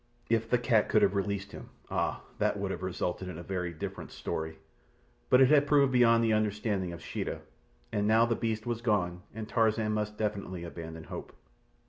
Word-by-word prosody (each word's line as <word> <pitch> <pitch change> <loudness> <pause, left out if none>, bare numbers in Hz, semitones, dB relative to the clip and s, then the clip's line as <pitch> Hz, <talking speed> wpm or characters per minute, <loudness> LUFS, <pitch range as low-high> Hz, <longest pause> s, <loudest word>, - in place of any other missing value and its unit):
If 115 0 +2
the 125 - +4
cat 120 -3 +2
could 110 - +4
have 100 - +4
released 100 0 -2
him! - - -10 0.2
Ah! - - -1 0.2
that - - +1
would - - -2
have 85 - -4
resulted 95 0 -2
in 90 -3 -6
a 85 - -7
very 90 -1 -3
different 80 - -6
story; 80 0 -4 0.7
but 125 - +6
it 130 - +7
had 145 -1 +5
proved 140 -2 +4
beyond 115 -2 +5
the 110 -1 +3
understanding 105 -3 0
of 85 - -9
Sheeta, - - -4 0.5
and 105 -1 0
now 110 +2 +5
the 120 0 +1
beast 110 -1 -2
was 120 -1 -2
gone 90 -6 0
and 110 -1 -5
Tarzan 110 -1 +2
must 105 0 -2
definitely 100 -4 -3
abandon 80 -1 -7
hope. - - -8
105 Hz, 190 wpm, -30 LUFS, 90-115 Hz, 0.7 s, it